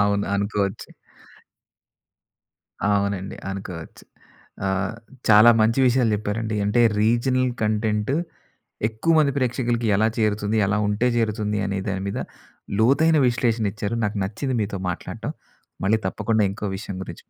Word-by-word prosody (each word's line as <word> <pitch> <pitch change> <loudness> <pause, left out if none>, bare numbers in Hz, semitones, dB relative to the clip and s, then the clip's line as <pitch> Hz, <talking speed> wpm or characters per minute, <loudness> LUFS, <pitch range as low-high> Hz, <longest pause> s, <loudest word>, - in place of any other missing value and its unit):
అవును. 100 0 +1
అనుకోవచ్చు. 100 -1 -2 2.0
అవునండి. 100 -1 -1
అనుకోవచ్చు. 90 -4 -8 0.6
ఆహ్, 95 +3 -1 0.3
చాలా 110 +2 +8
మంచి 115 +4 +2
విషయాలు 120 -3 +3
చెప్పారండి 110 +1 -3
అంటే 105 +4 +2 0.2
రీజనల్ 125 +3 +2
కంటెంట్ 105 +2 0 0.7
ఎక్కువ 115 +10 0
మంది 145 -2 +3
ప్రేక్షకులకి 120 -2 0
ఎలా 110 +2 +3
చేరుతుంది 105 0 0
ఎలా 105 +2 +1
ఉంటే 105 +4 +1
చేరుతుంది 105 -2 0
అనే 100 0 -2
దాని 95 -1 -2
మీద 100 - -3 0.6
లోతైన 150 +8 +4
విశ్లేషణ 120 -2 0
ఇచ్చారు. 105 +2 -3
నాకు 105 +1 -2
నచ్చింది 120 +6 -3
మీతో 100 -1 -4
మాట్లాడటం 90 - -5 0.5
మళ్ళీ 110 +3 +2
తప్పకుండా 110 +2 0
ఇంకో 105 - -7
విషయం 100 -2 -6
గురించి - - -9
110 Hz, 120 wpm, -23 LUFS, 100-115 Hz, 2.0 s, చాలా